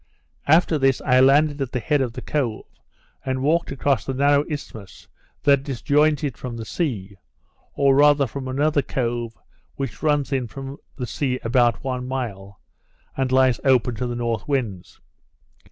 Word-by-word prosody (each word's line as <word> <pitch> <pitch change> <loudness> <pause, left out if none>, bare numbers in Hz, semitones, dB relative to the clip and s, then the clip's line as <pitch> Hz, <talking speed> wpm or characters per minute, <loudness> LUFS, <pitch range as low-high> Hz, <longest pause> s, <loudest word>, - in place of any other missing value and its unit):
After 160 +1 +4
this 135 -1 +2
I 130 0 +3
landed 145 +2 +4
at 135 - -3
the 125 - 0
head 145 +4 +1
of 125 -3 -2
the - - -8
cove, 125 -8 -2 0.6
and 130 0 -2
walked 165 +3 +1
across 135 0 0
the 135 - -4
narrow 145 +1 +3
isthmus 110 - -8 0.4
that 140 -2 +4
disjoins 145 +3 +1
it 135 -7 -3
from 120 -2 -6
the 115 - -6
sea, 105 - -3 0.6
or 140 -1 +4
rather 145 0 +5
from 130 +2 -6
another 145 +3 +1
cove 120 -3 -3 0.4
which 135 -4 -5
runs 145 -3 +1
in 130 -3 -1
from 135 +4 -8 0.2
the 125 - -4
sea 130 0 -2
about 120 0 +2
one 125 -1 -3
mile, 100 -7 -5 0.6
and 130 -1 -1
lies 130 -2 +3
open 125 -3 +3
to 125 - -2
the 120 - -4
north 115 -2 -2
winds. 115 -11 -3
130 Hz, 165 wpm, -22 LUFS, 120-145 Hz, 0.6 s, rather